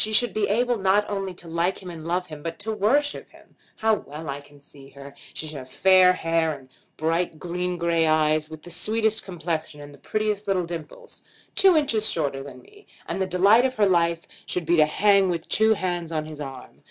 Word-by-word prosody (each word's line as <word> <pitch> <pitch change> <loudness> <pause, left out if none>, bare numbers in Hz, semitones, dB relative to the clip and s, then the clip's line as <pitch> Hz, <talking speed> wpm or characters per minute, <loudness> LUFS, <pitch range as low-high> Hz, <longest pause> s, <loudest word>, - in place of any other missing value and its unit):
She 215 - -2
should 220 -1 +5
be 210 0 0
able 240 +3 +1
not 195 +2 +2
only 195 -2 -3
to 175 - -10
like 170 +3 -1
him 180 - -7
and 165 -1 -9
love 180 +1 -1
him, 155 -3 -10
but 165 +2 -5
to 215 +2 -3
worship 260 +8 0
him. - - -21 0.2
How 220 0 +2
well 155 -6 -5
I 140 +1 -4
can 145 0 -19
see 140 -1 -16
her! 140 0 -12 0.2
She - - -5
should 155 -1 -7
have 130 0 -11
fair 185 +4 +5
hair, 165 -3 0
and 130 -1 -18 0.3
bright 165 +1 -1
green 180 +2 -3
gray 170 -1 +1
eyes, 155 0 +2
with 155 -1 -10
the 175 - -10
sweetest 220 +5 0
complexion, 160 -4 -4
and 145 0 -11
the 140 - -16
prettiest 215 +2 -2
little 185 -3 +1
dimples; 165 -3 -8 0.3
two 380 -4 +5
inches 230 -8 +2
shorter 140 -4 -1
than 140 - -11
me, 415 +1 -20 0.2
and 195 - -3
the 190 - 0
delight 200 +6 +5
of 260 0 0
her 210 - +3
life 170 -3 +1 0.2
should 180 -2 -2
be 170 +2 +3
to 155 -1 +5
hang 200 +3 +3
with 170 -2 -3
two 220 0 +3
hands 175 -3 -3
on 155 -1 -2
his 155 -1 -9
arm. 135 -2 -9
175 Hz, 220 wpm, -24 LUFS, 155-205 Hz, 0.3 s, should